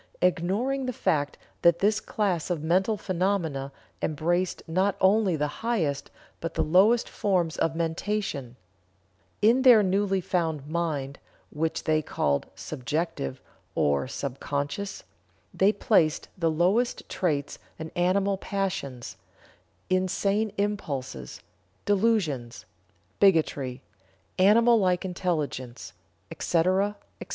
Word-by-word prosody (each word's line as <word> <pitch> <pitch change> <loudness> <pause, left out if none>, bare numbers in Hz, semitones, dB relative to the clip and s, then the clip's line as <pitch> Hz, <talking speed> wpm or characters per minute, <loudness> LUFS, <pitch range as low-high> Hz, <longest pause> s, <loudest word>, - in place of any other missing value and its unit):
ignoring 205 +10 +1
the 255 - -2
fact 145 -8 0 0.2
that 170 0 +5
this 210 +1 +2
class 190 -7 -1
of 170 -4 -2
mental 190 +6 +2
phenomena 175 -8 -1 0.3
embraced 175 +4 -1
not 185 +4 +1
only 195 -1 +3
the 150 -1 0 0.2
highest 185 -12 -1 0.3
but 165 0 -5
the - - +2
lowest 195 +9 +4
forms 180 -5 0
of 160 0 0
mentation 165 - -2 0.9
In 235 +5 +5
their 245 -5 +7
newly 195 0 +1
found 165 -5 -1
"mind" 150 -4 -3 0.3
(which 160 +2 -2
they 155 -1 +2
called 70 - -1
"subjective" 130 - -3 0.4
or 70 - +1
"sub 135 0 -5
conscious"), 145 +8 -3 0.5
they 195 +2 +4
placed 170 -10 +2
the 165 -3 +1
lowest 185 +10 +1
traits 145 -6 -2 0.2
and 160 0 -7
animal 195 +3 +2
passions; 185 -13 -4 0.7
insane 195 +3 +1
impulses; 140 - -3 0.4
delusions; 190 - 0 0.5
bigotry; 145 -9 +2 0.6
animal 230 +4 +6
like 185 -2 +1
intelligence, 155 -9 -3 0.4
etc., 185 +4 +1 0.2
etc. - - -8
175 Hz, 110 wpm, -27 LUFS, 150-200 Hz, 0.9 s, their